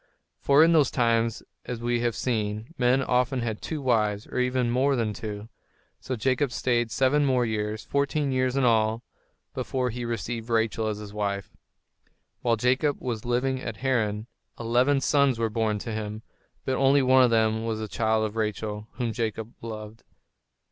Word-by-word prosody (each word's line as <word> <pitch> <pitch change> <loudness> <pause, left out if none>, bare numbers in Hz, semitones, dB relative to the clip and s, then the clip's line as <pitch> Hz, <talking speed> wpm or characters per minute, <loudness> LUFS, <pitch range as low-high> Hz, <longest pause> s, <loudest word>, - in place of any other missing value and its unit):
For 140 +2 +5
in 165 +1 +5
those 150 -5 +4
times, 115 -2 +1 0.2
as 125 -2 -5
we 120 0 0
have 120 -1 0
seen, 110 +2 -2
men 130 0 +2
often 125 +1 +1
had 110 -2 -3
two 155 -3 -4
wives, 105 -5 +1
or - - -4
even 125 -1 +1
more 135 +3 +2
than 115 -4 -1
two. 105 0 -6 0.5
So 130 - -4
Jacob 130 +3 0
stayed 120 -2 0
seven 135 +4 +2
years 110 -4 -1
more, - - -31
fourteen 140 0 +1
years 130 0 +1
in 135 - +2
all, 115 -1 +2 0.5
before 125 -2 -2
he 120 +2 -5
received 115 0 -4
Rachel 110 -1 +1
as 105 -1 -2
his 105 -1 -9
wife. 100 -3 -3 0.9
While 120 -1 +2
Jacob 130 +5 +1
was 120 -4 -4
living 130 +2 0
at 110 - -5
Haran, 110 -5 0 0.3
eleven 125 +4 +2
sons 140 -3 +3
were 115 -1 -1
born 110 -1 0
to 115 +3 -6
him. 110 0 -5 0.4
But 130 - 0
only 135 +1 +4
one 130 0 +5
of 125 - +4
these 110 -1 +2
was 115 -1 -2
the 110 0 -4
child 110 0 +1
of 105 0 -5
Rachel, 105 -1 -3
whom 120 -3 -2
Jacob 115 -1 -3
loved. 110 -1 -8
120 Hz, 175 wpm, -26 LUFS, 110-130 Hz, 0.9 s, For